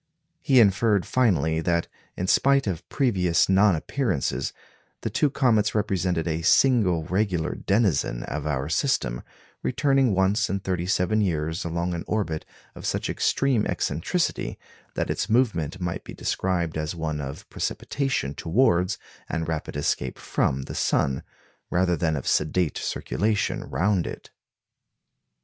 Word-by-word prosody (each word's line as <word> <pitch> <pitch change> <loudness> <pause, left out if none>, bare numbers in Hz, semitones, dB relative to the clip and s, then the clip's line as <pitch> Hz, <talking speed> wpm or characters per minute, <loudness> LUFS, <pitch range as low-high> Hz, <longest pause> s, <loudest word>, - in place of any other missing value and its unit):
He 135 -2 +4
inferred 105 -1 +4
finally 80 - +2
that, 85 0 0 0.3
in 90 - -1
spite 140 +7 +3
of 90 -5 -4
previous 95 - +2
non 95 0 +5
appearances, 75 - -1 0.5
the - - -3
two 150 - +2
comets 115 -7 +2
represented 90 -5 0
a 80 0 -1
single 95 -4 +4
regular 90 -1 0
denizen 95 - +1
of 75 +1 -4
our 70 -2 -1
system, 75 - 0 0.4
returning 135 -4 +2
once 95 +3 +2
in 100 +2 -1
thirty 90 -2 -2
seven 100 +3 +2
years 80 -3 -1
along 85 +1 -2
an 85 - -4
orbit 90 -8 -2 0.3
of - - -6
such - - -1
extreme 135 -6 +1
eccentricity 125 - -1 0.4
that - - -1
its - - -2
movement 105 - +1
might 90 -2 -3
be - - -9
described 85 -4 -1
as 75 +2 -3
one 80 -2 -3
of 70 0 -7
precipitation 135 - -2
towards 90 - +2 0.3
and 80 -1 -2
rapid 80 -3 -3
escape 65 -3 -1
from 65 0 -1
the - - -7
sun, 70 -1 +1 0.5
rather 90 0 +2
than 80 0 0
of 70 - -4
sedate 80 +1 +1
circulation 105 -1 -1
round 90 +6 0
it. - - -8
90 Hz, 135 wpm, -25 LUFS, 80-105 Hz, 0.5 s, non